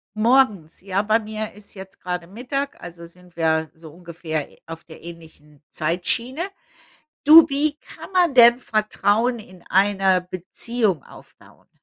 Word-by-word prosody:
Morgens, 215 -9 +1
ja. 195 0 -1
Bei 215 +2 +1
mir 215 -1 -6
ist 210 0 -15
jetzt 190 0 -12
grade 180 -1 -5
Mittag, 255 +8 -5
also 170 -1 -10
sind 180 +1 -19
wir 160 -1 0
so 160 -1 -14
ungefähr 165 -3 -6 0.2
auf 165 0 -10
der 160 - -15
ähnlichen 160 -3 -14
Zeitschiene. 210 - -1 0.8
Du, 315 +1 +9
wie 290 +1 -1
kann - - -13
man 355 -6 +2
denn 240 0 +7
Vertrauen 220 +1 0
in 185 -5 -15
einer 195 -1 +2
Beziehung 185 - -3
aufbauen? - - -19
195 Hz, 135 wpm, -21 LUFS, 170-235 Hz, 0.8 s, Du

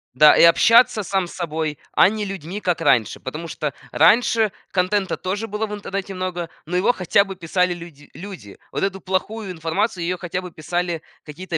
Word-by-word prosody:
Да, 150 +3 +7
и - - +6
общаться 220 +7 +6
сам 195 -1 -1
с - - -11
собой, 155 -4 -3
а - - +6
не 210 +2 -2
людьми, 190 0 -6
как 180 -4 -1
раньше. 125 -8 +2
Потому 155 +6 -6
что 150 -2 -4 0.2
раньше 225 -2 +4 0.2
контента 190 +1 0
тоже 200 +4 -3
было 210 +1 -2
в 210 - -7
интернете 195 -1 -5
много, 180 -2 -4 0.2
но 180 +2 -1
его 190 +6 +3
хотя 185 +1 +3
бы 195 -1 -8
писали 180 +1 0
люди 170 -4 -12
люди. 180 - -10
Вот - - -2
эту 195 -1 -2
плохую 195 +3 -3
информацию, 180 +4 -2
ее 180 +2 -1
хотя 180 +1 -4
бы 180 -1 -9
писали 175 +1 -3 0.2
какие-то 165 +3 -5
180 Hz, 185 wpm, -21 LUFS, 165-200 Hz, 0.2 s, Да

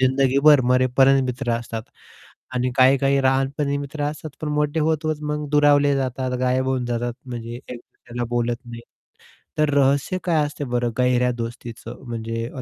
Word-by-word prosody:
जिंदगीभर 135 +2 +4
मरेपर्यंत 130 +2 +4
मित्र 125 0 -3
असतात 115 -1 -6 0.7
आणि 125 0 0
काही-काही 135 +1 +4
लहानपणी 135 +2 +1
मित्र 145 +1 -5
असतात, 150 +1 -5
पण 155 - -3
मोठे 150 +1 0
होत-होत 155 0 0
मग 150 0 -3
दुरावले 145 -1 +4
जातात, 130 -1 -2
गायब 130 +1 +1
होऊन 130 -1 0
जातात. 120 0 -2
म्हणजे 120 -2 -6
एक 125 -1 -9
दुसऱ्याला 120 0 -8
बोलत 120 0 0
नाही. 120 -1 -8 0.8
तर 150 -1 +2
रहस्य 140 +6 +2
काय 165 -4 +2
असते 145 0 -5
बरं 120 -1 -1
गहऱ्या 125 0 +2
दोस्तीचं 115 +1 -7
म्हणजे 115 0 -4
अ, 130 - -5
130 Hz, 150 wpm, -22 LUFS, 120-145 Hz, 0.8 s, जिंदगीभर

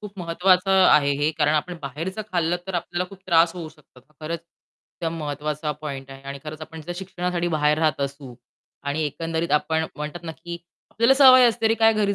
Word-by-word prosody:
खूप 205 -2 -10
महत्वाचं 180 +2 +2 0.2
आहे 145 -1 +5
हे 150 +1 +2
कारण 150 0 +3
आपण 175 +4 -1
बाहेरचं 165 +10 -5
खाल्लं 175 -1 +1
तर 190 - -5
आपल्याला 175 +1 -2
खूप 195 0 -13
त्रास 165 -1 +4
होऊ 170 -3 -6
शकतो. 150 -4 -20
तर 150 +5 -32
खरंच 160 +1 -4 0.6
त्या 165 -2 -1
महत्त्वाचा 150 -1 -3
पॉइंट 135 -2 -6
आहे 135 0 -11
आणि 140 - -6
खरंच 155 0 -7
आपण 160 +1 -9
जर 175 - -3
शिक्षणासाठी 180 -2 -3
बाहेर 150 -1 +2
राहत 155 -3 +1
असू 140 -2 -5 0.5
आणि 145 +3 -2
एकंदरीत 165 +3 -3
आपण 160 +2 +1
म्हणतात 150 +3 -6
ना, 165 - -5
की 170 +1 -8 0.3
आपल्याला 235 +4 +4
सवय 260 -2 +8
असते 225 -1 0
अरे 225 - +3
काय 225 0 +6
घरी 205 -2 +1
165 Hz, 200 wpm, -23 LUFS, 150-180 Hz, 0.6 s, सवय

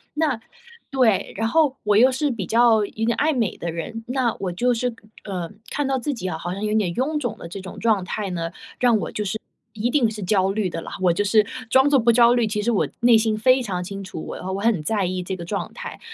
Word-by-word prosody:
那 300 -7 +1 0.5
对， 250 -7 +2
然 225 +2 0
后 295 -1 +3
我 210 -1 +3
又 255 +4 +6
是 275 +2 0
比 205 -6 -4
较 230 -2 +4
有 220 +2 -4
点 235 - +2
爱 310 +1 +2
美 230 -7 -1
的 170 - -4
人， 225 +8 -6
那 250 -2 0
我 185 -2 -2
就 245 +6 +2
是， 240 0 -2 0.3
呃， 180 -4 -4 0.2
看 290 - -1
到 270 -1 0
自 285 +4 -2
己 205 -7 -5
啊， 160 - -3
好 175 +2 -4
像 200 - -5
有 210 0 0
点 205 -5 +1
臃 300 +5 0
肿 240 -6 -3
的 - - -8
这 185 +4 -7
种 190 0 -9
状 215 -5 +2
态 200 +1 -3
呢， 165 -2 -3 0.3
让 240 -3 +4
我 - - -4
就 210 - -3
是 220 +3 -2 0.4
一 220 +2 -1
定 250 -6 +3
是 210 -2 -6
焦 190 0 +2
虑 200 -2 -1
的 165 -1 -5
啦， - - -8
我 180 - +4
就 205 +5 0
是 215 +1 +4 0.3
装 265 +3 +5
作 280 -2 +5
不 235 0 +4
焦 235 +1 +6
虑， 240 -2 +2
其 210 0 -1
实 235 +3 +1
我 215 - +1
内 235 -2 +6
心 220 -1 +1
非 255 +3 +4
常 185 -7 -3
清 195 +2 -6
楚， 185 -4 -7
我 - - -6
的 - - -9
话， 190 - -3
我 195 - -2
很 215 -7 +2
在 200 +4 0
意 185 0 -2
这 185 +1 -4
个 175 - -7
状 200 +3 -3
态。 - - -8
220 Hz, 285 characters per minute, -23 LUFS, 190-245 Hz, 0.5 s, 又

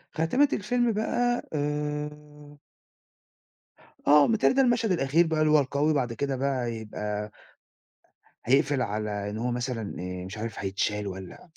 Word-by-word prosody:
خاتمة 250 - +3
الفيلم 240 +3 +1
بقى 240 +3 0
آآ 150 0 -4 1.5
آه، 145 0 +7
متهيّأ 225 -1 +3
لي - - 0
ده 270 - +5
المشهد 240 -4 +2
الأخير 165 0 +3
بقى 160 -1 0
اللي 155 0 +3
هو 155 - +6
القوي 145 +3 +1
بعد 125 -5 0
كده 140 +3 -2
بقى 130 -1 -1
هيبقى 105 -2 -4 1.1
هيقفل 140 +2 +3
على 105 -2 -2
إن 105 - -5
هو 120 +2 -1
مثلًا 120 -3 -3
آآ 90 0 -5
مش 95 +3 -8
عارف 115 +1 -5
هيتشال 100 +1 -1
والّا 95 - -9
140 Hz, 145 wpm, -27 LUFS, 110-155 Hz, 1.5 s, آه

